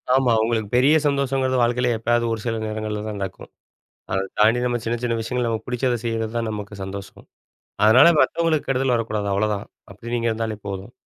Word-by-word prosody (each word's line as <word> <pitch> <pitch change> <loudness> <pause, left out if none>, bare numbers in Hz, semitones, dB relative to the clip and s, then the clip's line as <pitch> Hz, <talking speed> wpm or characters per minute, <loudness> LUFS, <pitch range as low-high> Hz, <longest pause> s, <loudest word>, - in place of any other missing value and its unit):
ஆமா. 130 -3 +3
உங்களுக்கு 110 -3 -1
பெரிய 135 +5 +5
சந்தோஷங்கிறது 135 -2 +1
வாழ்க்கையில 120 +1 +2
எப்பயாவது 120 +1 +1
ஒரு 110 - -3
சில 115 -1 -1
நேரங்கள்லதான் 110 -1 -4
நடக்கும். 95 0 -6 0.6
அத 95 - +1 0.2
தாண்டி 110 +3 +4
நம்ம 120 -1 0
சின்ன 115 +1 -1
சின்ன 120 -1 0
விஷயங்கள்ல 120 +1 -1
நமக்கு 110 -1 -4
புடிச்சதை 125 -1 0
செய்றதுதான் 115 0 -2
நமக்கு 105 -1 -6
சந்தோஷம். 95 0 -9 0.6
அதுனால, 110 +9 +7
மத்தவங்களுக்கு, 165 -3 +1
கெடுதல் 130 -1 +1
வரக்கூடாது 110 -3 -2
அவ்ளதான். 105 0 -1 0.3
அப்படி 115 +4 -8
நீங்க 115 -1 0
இருந்தாலே 110 -1 -3
போதும். 100 +3 -6
115 Hz, 165 wpm, -22 LUFS, 110-125 Hz, 0.6 s, அதுனால